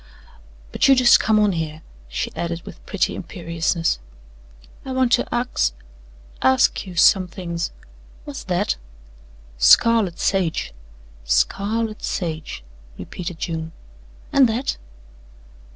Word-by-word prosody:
But - - +2
you 270 - +7
just 250 -2 +6
come 220 0 +2
on 210 -1 +3
here," 160 -2 -4 0.3
she - - -3
added 170 0 -3
with - - -11
pretty - - 0
imperiousness. 165 -2 -2 0.8
"I 265 - -5
want 255 -2 +2
to - - +3
axe 240 - 0 0.7
ask 130 +8 +3
you 180 - -8
some 185 +2 +5
things 170 -2 -4 0.6
what's - - -7
that?" 65 - 0 0.8
"Scarlet 200 - +5
sage." 185 - 0 0.5
"Scarlet 210 - 0
sage," 160 - -4 0.3
repeated 175 -2 -7
June. 160 -1 -4 0.6
"An' 275 -2 +6
that?" 235 +4 -2
180 Hz, 110 wpm, -22 LUFS, 165-220 Hz, 0.8 s, you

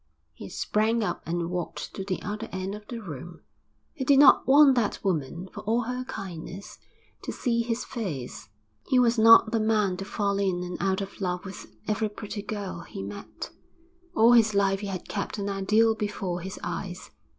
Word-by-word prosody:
He 95 - -9
sprang 220 +2 +1
up - - -2
and 170 +1 -2
walked 180 -1 -4
to 195 - -5
the 190 -1 -2
other 215 +2 -4
end 185 +1 -3
of 210 0 -9
the 235 - -5
room. 170 - -8 0.5
He 280 - -4
did 275 +1 +5
not 285 0 +7
want 280 0 +7
that 235 -5 +1
woman, 170 -1 -2
for - - -7
all 225 +3 +1
her 250 +2 -3
kindness, 190 -3 -7 0.4
to - - -4
see 235 -2 0
his 230 0 -2
face. 155 - -5 0.4
He 260 - +3
was 240 -2 +4
not 225 0 +8
the 230 - +1
man 215 -4 +2
to 195 - -5
fall 200 -1 -1
in 185 -3 0
and 180 0 -5
out 190 0 +1
of 195 +1 -7
love 180 -1 -2
with 190 - -9 0.2
every 215 0 0
pretty 210 0 -6
girl 200 -4 -5
he 95 - -8
met. 100 +1 -8 0.6
All 225 +2 +6
his 225 -3 +5
life 195 -1 +2
he 205 - -5
had 185 -3 -5
kept 200 +1 -3
an 200 -1 -3
ideal 210 +3 +3
before 200 -5 -3
his 190 +3 -6
eyes. 185 -2 -5
200 Hz, 190 wpm, -27 LUFS, 185-225 Hz, 0.6 s, not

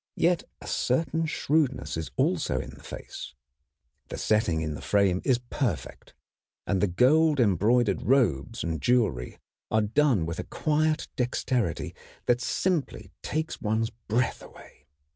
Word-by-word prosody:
Yet 170 0 +2
a - - -12
certain 160 +5 0
shrewdness 150 -3 0
is 80 -1 -4
also - - +1
in - - -6
the - - -14
face. - - -8 0.7
The - - -6
setting 90 -7 +1
in 75 -1 -2
the 75 - -7
frame 100 -3 +2
is 130 - +3
perfect, 120 - -4 0.5
and 95 -2 0
the 105 - +3
gold 145 - +4
embroidered 110 +2 +3
robes 115 - +1
and 80 -3 -2
jewelry 105 - +1 0.3
are 110 -1 +2
done 115 - +2
with 85 0 -4
a - - -2
quiet 155 +1 0
dexterity 125 -5 -1 0.3
that 120 0 +2
simply 170 +3 -1
takes 155 +1 -3
one's 110 +1 0
breath 115 +2 -1
away. - - -15
120 Hz, 140 wpm, -27 LUFS, 100-145 Hz, 0.7 s, gold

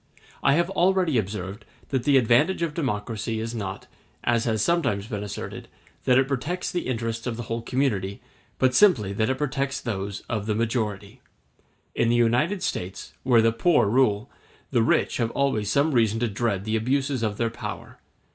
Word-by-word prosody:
I 140 - +4
have 170 +4 +1
already 180 -8 +2
observed 100 0 -5 0.3
that 130 -3 -1
the 145 -2 +5
advantage 135 +10 +3
of 160 -3 -1
democracy 110 -6 -2
is 115 +1 -4
not, 100 -4 -5 0.4
as 120 -1 +1
has 115 - +1
been 170 +7 +2
sometimes 105 -4 -2
asserted, 105 -1 -5 0.4
that 125 - +5
it 135 0 +3
protects 145 +7 -2
the 175 - -2
interests 115 -1 -3
of 115 -2 -3
the 120 - -4
whole 115 +1 -3
community, 115 -6 -1 0.4
but 130 -1 +3
simply 125 - +4
that 110 +3 0
it 130 - 0
protects 140 -1 -1
those 100 -4 -4
of 110 -3 -4
the 105 - 0
majority. 110 0 -2 0.7
In 115 - +1
the 120 - +3
United 125 - +2
States, 90 +2 -4
where 120 -3 +4
the 115 - +4
poor 145 - +3
rule, 115 0 +2 0.4
the 120 -4 +3
rich 115 - +2
have 115 -2 0
always 115 -7 0
some 145 +5 +3
reason 115 -4 +2
to 120 - +2
dread 100 -2 -1
the 110 0 0
abuses 130 +3 0
of 105 -2 -1
their 115 -1 0
power. - - -7
115 Hz, 180 wpm, -25 LUFS, 105-135 Hz, 0.7 s, the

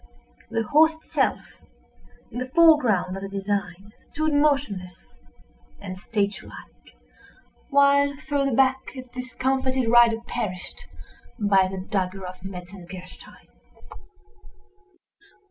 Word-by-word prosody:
The 225 - -1
horse 315 +7 +4
itself, 320 - -2 0.7
in 245 - -5
the 255 0 -4
foreground 255 - +4
of 195 - -6
the 195 - -6
design, 200 0 -4 0.2
stood 310 0 -1
motionless 270 - -1 0.6
and 185 -2 -7
statue 200 0 -2
like—while 280 - -2
farther 280 -3 -1
back, 265 0 +1
its 255 -1 -9
discomfited 260 0 -1
rider 235 -1 +6
perished 195 -8 -5 0.5
by 200 -4 +3
the 190 +1 -6
dagger 190 -1 -2
of 185 0 -9
a - - -5
Metzengerstein. 180 0 -11
225 Hz, 100 wpm, -24 LUFS, 190-270 Hz, 0.7 s, rider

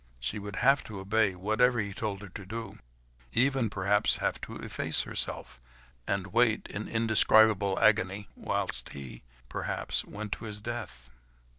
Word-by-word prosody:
She 60 - -3
would 100 0 -7
have 135 +4 +4
to 105 -3 -7
obey, 100 0 +1
whatever 110 +6 +2
he 100 -2 -2
told 105 -1 -4
her 100 - -9
to 100 +2 -9
do, 110 +1 -7 0.5
even 130 -1 +2
perhaps 105 +3 +3
have - - -2
to - - -7
efface - - 0
herself, 60 - -2 0.5
and 95 -1 -2
wait, 115 -2 +3
in 105 +2 -5
indescribable 110 -3 +4
agony, 105 -2 +2
whilst - - -3
he, 65 -4 -9 0.3
perhaps, - - -2
went 105 0 -7
to 115 - -4
his 105 -1 -4
death. 105 - -6
105 Hz, 150 wpm, -29 LUFS, 100-110 Hz, 0.5 s, have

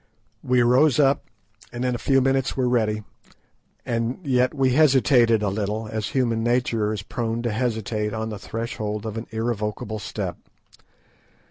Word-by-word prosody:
We 125 -1 +2
rose 130 +3 +4
up, 140 -1 +3 0.5
and 120 +1 -3
in 125 - +1
a 120 - -3
few 135 -1 +3
minutes 135 0 +1
were 130 -1 +1
ready, 110 -3 +1 0.8
and 115 +1 -1
yet 130 -2 +2
we 135 -3 +1
hesitated 130 -5 +4
a 100 - +1
little, 105 +2 -2
as 110 -1 -2
human 115 -4 0
nature 120 -3 +1
is 105 -2 -4
prone 115 +1 -3
to 120 - -1
hesitate 110 -2 -1
on 110 +1 -3
the 105 -2 -6
threshold 110 -1 -4
of 110 -1 -4
an 115 +1 -5
irrevocable 110 -1 -3
step. 90 -6 -4
115 Hz, 155 wpm, -24 LUFS, 110-125 Hz, 0.8 s, rose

